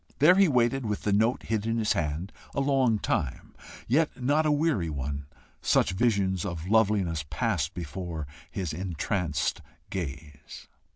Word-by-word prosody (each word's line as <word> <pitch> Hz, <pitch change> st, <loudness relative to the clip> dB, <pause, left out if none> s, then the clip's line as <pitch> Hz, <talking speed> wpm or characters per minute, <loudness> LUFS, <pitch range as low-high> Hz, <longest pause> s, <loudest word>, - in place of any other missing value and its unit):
There 155 Hz, +5 st, +7 dB
he 195 Hz, 0 st, +5 dB
waited, 130 Hz, -1 st, +2 dB
with 105 Hz, -2 st, -3 dB
the 105 Hz, -, +1 dB
note 110 Hz, +5 st, +2 dB
hid 110 Hz, -1 st, -1 dB
in 115 Hz, 0 st, 0 dB
his 110 Hz, -2 st, +2 dB
hand 80 Hz, +4 st, -2 dB, 0.2 s
a -, -, +1 dB
long 135 Hz, -5 st, +3 dB
time, 70 Hz, -9 st, -2 dB, 0.3 s
yet 150 Hz, +3 st, +1 dB
not 145 Hz, +5 st, +2 dB
a -, -, +3 dB
weary 145 Hz, -, +1 dB
one, 70 Hz, -1 st, -4 dB, 0.3 s
such -, -, +3 dB
visions 95 Hz, -3 st, +1 dB
of 85 Hz, -4 st, -4 dB
loveliness 100 Hz, -6 st, +2 dB
passed 70 Hz, -, -1 dB
before 85 Hz, -1 st, -5 dB, 0.2 s
his 90 Hz, -5 st, -3 dB
entranced 90 Hz, -1 st, -1 dB, 0.3 s
gaze. 75 Hz, -4 st, -7 dB
100 Hz, 150 wpm, -28 LUFS, 80-120 Hz, 0.3 s, There